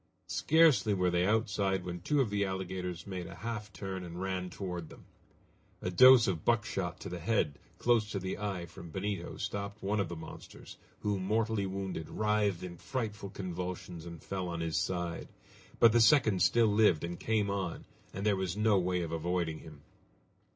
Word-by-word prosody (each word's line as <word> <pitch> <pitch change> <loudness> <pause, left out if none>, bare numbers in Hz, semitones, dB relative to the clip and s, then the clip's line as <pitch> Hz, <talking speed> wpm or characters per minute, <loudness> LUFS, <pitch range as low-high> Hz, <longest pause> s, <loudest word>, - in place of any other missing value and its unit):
Scarcely 155 -10 +4
were 90 -1 +2
they 90 +1 +2
outside 100 -4 +1
when 90 -1 -5
two 145 +9 +2
of 115 -6 0
the 100 0 +1
alligators 95 -2 -4
made 90 -3 -5
a - - -9
half 110 -2 -5
turn 95 -2 -5
and 85 0 -7
ran 95 -1 -2
toward 90 -3 -5
them. - - -14 0.7
A 90 - -3
dose 130 +4 +8
of 85 -5 -1
buckshot 105 -6 0
to - - -6
the 90 0 -5
head, 80 -6 0 0.2
close 115 -3 +2
to 105 - -3
the 95 0 -4
eye, 100 -4 -3
from 85 0 -11
Benito, 95 0 -4
stopped 100 +1 -4
one 105 +2 0
of 95 -4 0
the 85 - -5
monsters, 80 -1 -10 0.2
who, 105 -2 0
mortally 105 +1 0
wounded, 95 -4 -4
writhed 105 -4 +1
in 90 -1 -7
frightful 110 -6 -4
convulsions 90 -2 -5
and 85 -2 -9
fell 95 -2 -3
on 85 -1 -4
his 80 -2 -2
side. 85 0 -2 0.5
But 115 - +8
the 120 +1 +4
second 110 -6 +5
still 115 0 +4
lived, 105 -7 +4
and 85 0 -4
came 105 -3 +1
on, 95 -4 -3 0.3
and 100 +2 -5
there 105 -2 +4
was 95 0 -2
no 105 -2 +4
way 90 0 0
of 80 - -5
avoiding 85 -1 -1
him. 75 -3 -13
95 Hz, 185 wpm, -32 LUFS, 90-105 Hz, 0.7 s, dose